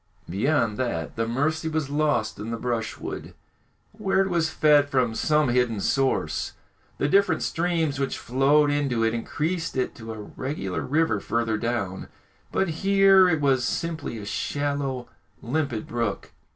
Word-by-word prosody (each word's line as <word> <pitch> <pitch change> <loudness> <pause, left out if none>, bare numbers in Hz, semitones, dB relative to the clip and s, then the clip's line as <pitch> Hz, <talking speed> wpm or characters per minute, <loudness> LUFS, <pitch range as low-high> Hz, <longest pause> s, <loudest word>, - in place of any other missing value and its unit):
Beyond 115 - +1
that, 85 -12 -2
the 115 0 -1
Mercy 155 +7 0
was 155 -3 -2
lost 145 -7 0
in 110 - -5
the 115 - -2
brushwood, 115 -2 -4 0.6
where 200 -2 +1
it 195 -1 0
was 165 -2 +1
fed 150 -2 +4
from 125 -4 +1
some 150 +3 +2
hidden 120 -3 +1
source. 135 +6 0 0.4
The 140 - +1
different 200 +4 +3
streams 165 -4 0
which 135 -1 -1
flowed 145 +4 +3
into 135 -6 0
it 115 0 +2
increased 160 +8 -2
it 130 - 0
to 115 -1 -7
a 110 - -7 0.2
regular 130 - -3
river 150 -7 +1
further 115 +1 -1
down, 100 -6 -2 0.4
but 190 - +1
here 195 -1 +6
it 160 -3 +1
was 135 -3 +3
simply 160 -7 -3
a 105 - -7
shallow, 140 +2 -2 0.4
limpid 130 -3 -1
brook. 120 -1 -3
135 Hz, 150 wpm, -25 LUFS, 115-155 Hz, 0.6 s, here